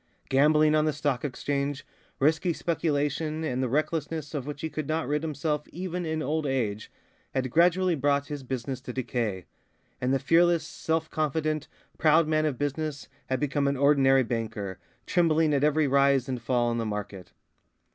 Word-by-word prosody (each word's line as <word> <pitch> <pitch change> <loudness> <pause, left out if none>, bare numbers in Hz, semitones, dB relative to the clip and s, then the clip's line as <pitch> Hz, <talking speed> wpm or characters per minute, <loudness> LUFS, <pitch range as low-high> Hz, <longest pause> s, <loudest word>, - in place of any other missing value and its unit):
Gambling 150 +3 +4
on 155 0 +3
the 155 - +1
Stock 145 -3 -1
Exchange, 140 0 -2 0.3
risky 160 +4 +2
speculation, 155 -1 -1
and 130 -5 -1
the 130 - 0
recklessness 155 +2 -2
of 140 -3 -4
which 145 -1 -6
he 160 - -2
could 155 -2 -4
not 160 -2 -1
rid 150 +1 0
himself 150 -1 -2
even 180 0 -4
in 160 0 -2
old 155 +2 -1
age, 110 -6 -2 0.4
had 130 -1 -1
gradually 180 +3 +4
brought 140 -1 +1
his 145 -1 -6
business 130 0 -4
to 125 -1 -7
decay; 115 -7 -2 0.6
and 125 +1 +1
the 135 - +3
fearless, 165 +3 +3
self 160 0 -2
confident, 155 0 -1 0.3
proud 155 +1 +4
man 155 0 +2
of 140 -4 -2
business 145 0 -3 0.2
had 130 - -1
become 145 -1 0
an 140 0 0
ordinary 135 -1 +4
banker, 110 -5 -4 0.3
trembling 160 -3 +2
at 140 0 +2
every 150 0 +3
rise 140 -1 +3
and 130 -2 -3
fall 120 0 +1
in 115 - -1
the - - -1
market. 105 -3 -6
145 Hz, 170 wpm, -27 LUFS, 130-155 Hz, 0.6 s, Gambling